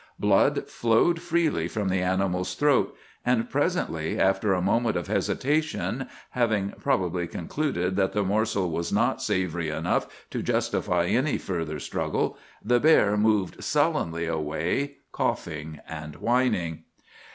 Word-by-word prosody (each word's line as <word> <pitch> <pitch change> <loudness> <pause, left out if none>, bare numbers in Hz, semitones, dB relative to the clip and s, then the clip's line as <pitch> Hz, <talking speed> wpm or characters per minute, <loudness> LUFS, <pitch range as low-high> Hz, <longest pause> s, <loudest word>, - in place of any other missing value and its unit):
Blood - - +3
flowed 120 +9 +2
freely 165 - +1
from 105 +2 -2
the 95 0 +1
animal's 90 0 0
throat; 145 -1 +2 0.3
and 120 -2 +1
presently, 145 - 0
after 95 +2 +2
a 95 - +2
moment 110 +4 +1
of 85 - -3
hesitation, 145 -3 -1 0.2
having 110 -5 +1
probably 90 -1 0
concluded 90 - -2
that 95 -1 +2
the 105 - +1
morsel 100 -2 0
was 85 +1 -2
not - - +1
savory 85 -3 -1
enough 75 - 0 0.2
to - - -2
justify 90 -1 0
any 130 +10 +1
further 80 -5 -3
struggle, - - -1 0.3
the 120 +2 +4
bear 130 -9 +5
moved 105 -4 +1
sullenly 85 0 +1
away, 80 - -1 0.2
coughing 80 -1 -3
and 75 -2 -7
whining. 115 -8 0
95 Hz, 130 wpm, -26 LUFS, 85-120 Hz, 0.3 s, bear